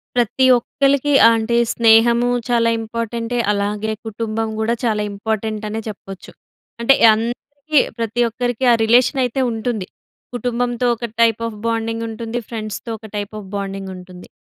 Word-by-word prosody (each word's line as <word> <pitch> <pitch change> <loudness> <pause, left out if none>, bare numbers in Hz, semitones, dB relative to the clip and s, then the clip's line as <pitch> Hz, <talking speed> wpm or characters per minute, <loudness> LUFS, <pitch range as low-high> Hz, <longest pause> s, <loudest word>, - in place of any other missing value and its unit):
ప్రతి 245 +2 +2
ఒక్కలికి 280 +3 +1 0.2
అంటే 230 +1 +1 0.2
స్నేహము 235 +1 +4 0.2
చాలా 230 -1 +3
ఇంపార్టెంటే, 230 +1 -4
అలాగే 210 +1 -1
కుటుంబం 220 0 -3
గూడా 225 +2 0
చాలా 215 -2 +1
ఇంపార్టెంట్ 215 +1 -3
అనే 220 +1 -3
చెప్పొచ్చు. 195 -2 -9 0.5
అంటే, 270 +4 +5 0.2
అందరికి 280 +7 -1 0.2
ప్రతి 230 +1 -1
ఒక్కరికి 245 +2 -2
ఆ - - +6
రిలేషన్ 250 +4 +3
అయితే 250 +2 -2
ఉంటుంది. 225 -3 -3 0.5
కుటుంబంతో 245 0 -1
ఒక 235 - -5 0.2
టైప్ 230 -1 +3
ఆఫ్ 220 -2 -8
బాండింగ్ 225 0 -2
ఉంటుంది, 230 +1 -4
ఫ్రెండ్స్‌తో 215 0 -6
ఒక 220 - -15
టైప్ 205 -1 -4
ఆఫ్ 200 - -11
బాండింగ్ 195 -1 -5
ఉంటుంది. 180 0 -12
230 Hz, 135 wpm, -19 LUFS, 215-240 Hz, 0.5 s, ఆ